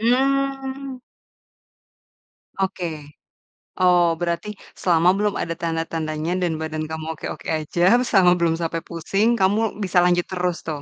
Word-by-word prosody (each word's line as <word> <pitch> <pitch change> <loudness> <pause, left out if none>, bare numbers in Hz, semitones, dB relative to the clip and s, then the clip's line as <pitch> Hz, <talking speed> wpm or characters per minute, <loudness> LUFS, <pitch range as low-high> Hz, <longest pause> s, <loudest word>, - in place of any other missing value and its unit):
Mmm. 270 +1 0 1.6
Oke. 190 -1 -1 0.9
Oh, 175 -2 +4
berarti 175 +4 -3 0.2
selama 175 -1 +3
belum 210 -1 +1
ada 165 - -2
tanda-tandanya 165 -1 -2
dan 165 -3 0
badan 155 0 -3
kamu 160 0 -5
oke-oke - - -7
aja, 175 +9 +2
selama 190 -7 +4
belum 165 -1 +1
sampai 165 -1 -2
pusing 195 +7 0
kamu 205 +3 +1
bisa 185 -2 -1
lanjut 175 0 +2
terus 180 -2 -1
tuh. 150 -3 -4
175 Hz, 120 wpm, -22 LUFS, 165-210 Hz, 1.6 s, Oh